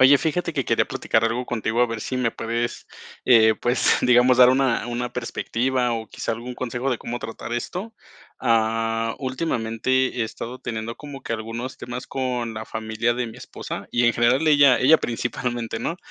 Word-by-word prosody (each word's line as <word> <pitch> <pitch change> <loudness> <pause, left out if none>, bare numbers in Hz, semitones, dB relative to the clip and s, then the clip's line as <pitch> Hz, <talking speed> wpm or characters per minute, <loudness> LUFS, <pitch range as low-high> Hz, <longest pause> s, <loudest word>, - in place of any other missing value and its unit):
Oye, 135 +2 +7
fíjate 170 +3 -1
que 135 -5 -1
quería - - +2
platicar 110 - 0
algo 120 +2 -1
contigo, 115 0 -1
a 125 - +5
ver 115 -1 -5
si 130 - -3
me 125 -2 0
puedes, 120 +1 -3 0.4
eh, 110 -3 +6
pues, 120 +3 +2
digamos, 125 0 +5
dar 125 -1 +9
una 130 -3 +1
una 120 +1 -3
perspectiva 125 +1 -1
o 115 -1 -4
quizá - - -3
algún 120 +2 -6
consejo 125 +1 -2
de 120 - -1
cómo 120 +1 -5
tratar 115 0 -7
esto. 185 - -4 0.5
Ah, 115 -1 +1
últimamente 130 -2 -1
he - - +2
estado 115 +3 -7
teniendo 115 -1 -5
como 145 -3 -9
que - - -4
algunos 115 +3 -5
temas 125 +1 -7
con 125 -3 -2
la 110 0 -5
familia 110 +2 -1
de 120 -1 -2
mi 110 - -11
esposa - - -7
y, 120 - +2
en 120 - +5
general, 120 +6 +3
ella 145 -4 +6
ella 155 +5 +6
principalmente, 120 -1 -3
¿no? 165 +9 -3
120 Hz, 185 wpm, -23 LUFS, 115-130 Hz, 0.5 s, dar